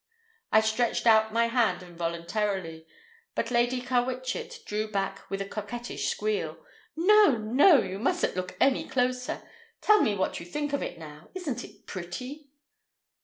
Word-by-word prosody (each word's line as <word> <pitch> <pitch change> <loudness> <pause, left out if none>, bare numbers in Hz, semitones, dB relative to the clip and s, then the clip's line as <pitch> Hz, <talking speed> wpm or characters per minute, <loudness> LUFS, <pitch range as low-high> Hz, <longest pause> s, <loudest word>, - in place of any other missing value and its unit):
I 220 - +6
stretched 220 +3 0
out 220 -1 +5
my 230 +1 +3
hand 230 -7 +1
involuntarily, 170 0 -3 0.5
but 230 - -1
Lady 240 +1 +2
Carwitchet 255 - -2
drew 215 +1 -2
back 195 -2 -3
with 195 0 -2
a - - -10
coquettish 230 +4 -4
squeal. 430 +2 -2 0.4
"No! 375 - +5
no! 255 - +5
You 190 +1 -5
mustn't 340 - 0
look 185 0 -4
any 270 -1 +2
closer. 250 0 -1 0.3
Tell 425 -1 +5
me 210 - +2
what 190 - -1
you 170 - -8
think 290 +8 -3
of 285 - 0
it - - -4
now. 155 -1 -11
Isn't 290 -10 -3
it - - -14
pretty?" 250 - -7
230 Hz, 150 wpm, -28 LUFS, 195-265 Hz, 0.5 s, I